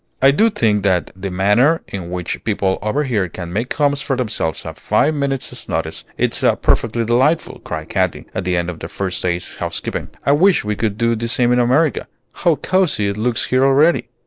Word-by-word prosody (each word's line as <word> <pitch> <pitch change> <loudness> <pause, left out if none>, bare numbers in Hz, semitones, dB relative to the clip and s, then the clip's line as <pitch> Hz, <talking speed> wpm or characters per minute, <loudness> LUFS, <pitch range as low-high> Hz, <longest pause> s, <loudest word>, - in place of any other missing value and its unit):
"I 135 +1 +6
do 220 +11 +3
think 110 - +1
that 95 -3 +1
the 95 +1 -5
manner 105 - +2
in 90 -3 -6
which 90 -1 -4
people 100 -3 0
over 110 +9 0
here 105 -9 -1
can 85 0 -7
make 115 +5 -2
homes 145 -2 +1
for 140 -2 -1
themselves 110 - -3
at - - -8
five 155 - +2
minutes' 140 -3 -3
notice - - -3
is - - 0 0.2
perfectly 115 +1 +1
delightful," 130 +8 +1
cried 80 0 -6
Katy, 95 -2 -1
at 95 - -3
the 90 0 0
end 85 +1 -1
of 80 - -11
their 80 - -7
first 95 -2 -3
day's 90 -1 -3
housekeeping. - - -4 0.2
"I - - +4
wish 175 - +4
we 105 0 -1
could 105 -1 -2
do 115 0 +1
the 115 +1 -3
same 120 0 +2
in 125 - +3
America. 135 +6 +2 0.3
How 170 -3 +2
cosy 160 - +1
it 100 - -4
looks 115 +2 0
here 130 +1 +3
already!" 145 +5 +3
115 Hz, 200 wpm, -18 LUFS, 95-140 Hz, 0.3 s, I